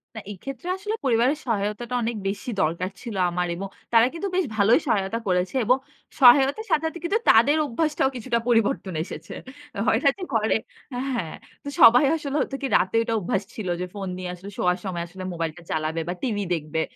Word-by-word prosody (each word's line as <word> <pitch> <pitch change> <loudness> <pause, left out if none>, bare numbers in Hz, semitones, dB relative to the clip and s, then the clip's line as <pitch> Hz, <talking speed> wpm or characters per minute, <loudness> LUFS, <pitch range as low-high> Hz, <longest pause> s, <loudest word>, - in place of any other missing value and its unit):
না, - - -5
এক্ষেত্রে 255 - -8
আসলে 415 +3 -4
পরিবারের 250 +4 +3
সহায়তাটা 225 +2 -2
অনেক 230 +1 -1
বেশি 200 +5 -4
দরকার 170 +4 -1
ছিল 230 -4 -6
আমার। 180 0 -1
এবং 195 +3 -5 0.3
তারা 230 0 +7
কিন্তু 335 +4 -3
বেশ 370 -1 +2
ভালোই 210 +6 +5
সহায়তা 200 0 0
করেছে। 180 +5 0
এবং 250 +4 +4 0.4
সহায়তার 265 +1 +7 0.2
সাথে 310 - +2
সাথে 345 - -9
কিন্তু 390 +6 +1
তাদের 260 +7 +6
অভ্যাসটাও 290 +1 0
কিছুটা 240 0 -1
পরিবর্তন 225 -5 +1
এসেছে। - - -9 0.5
হয় 225 +1 +4
না 280 - +6
যে 385 - -7
ঘরে, 220 -1 +2 0.4
হ্যাঁ, 245 -10 -3 0.3
তো 285 - -5
সবাই 245 +4 +8
আসলে 285 -3 -5
হতো 270 - -3
কি, 275 - -1
রাতের 190 +5 +1
একটা 230 0 -2
অভ্যাস 195 +1 -1
ছিল 215 -4 -6
যে - - -1
ফোন 200 -2 -5
নিয়ে 185 -1 -5
আসলে 190 +3 -10
শোয়ার 180 0 +1
সময় 175 -3 -3 0.3
মোবাইলটা 165 0 -4
চালাবে 160 +1 -1
বা, 175 - -1
TV 235 -6 -1 0.2
দেখবে। 160 -1 -2
225 Hz, 185 wpm, -24 LUFS, 185-265 Hz, 0.5 s, সবাই